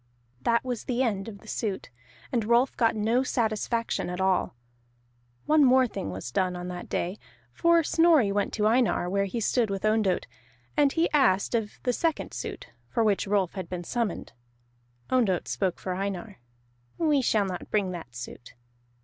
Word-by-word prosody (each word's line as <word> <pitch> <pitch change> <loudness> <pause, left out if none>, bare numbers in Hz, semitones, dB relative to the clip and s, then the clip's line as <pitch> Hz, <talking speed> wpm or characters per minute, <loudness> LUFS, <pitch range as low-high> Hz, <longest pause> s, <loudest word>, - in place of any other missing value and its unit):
That 235 - +2
was 245 -3 -3
the 255 0 0
end 200 -5 -1
of 200 -3 -9
the 220 - -17
suit, 205 - -3 0.4
and 235 -3 +1
Rolf 235 +4 +3
got 230 -2 +2
no 225 +4 +2
satisfaction 230 -4 -1
at 180 +1 -4
all. 190 -9 +1 0.9
One 305 -1 +5
more 260 0 +6
thing 215 - -5
was 95 +6 -6
done 185 +5 0
on 180 0 -5
that 180 -1 -7
day, 185 +4 -2 0.3
for 335 -1 +4
Snorri 315 -9 +4
went 205 0 0
to 210 - 0
Einar 230 -5 +2
where 200 0 +1
he 215 +5 -3
stood 230 0 +1
with 195 +1 -3
Ondott, 215 -3 +2 0.5
and 290 -2 +4
he 330 +3 +2
asked 250 -11 +3
of 225 -3 -2
the 250 - +1
second 325 +5 -1
suit, 415 -3 -6 0.2
for 225 - +1
which 205 -2 +1
Rolf 195 -3 +1
had 185 -4 -6
been 180 -1 -4
summoned. 220 - -3 0.8
Ondott 220 -9 +2
spoke 190 -3 -1
for 185 - -4
Einar. 195 +2 -4 0.6
"We 300 -4 +2
shall 215 -4 +2
not 180 -2 -5
bring 200 -3 +1
that 160 -9 -8
suit." 120 0 -9
215 Hz, 175 wpm, -27 LUFS, 190-250 Hz, 0.9 s, more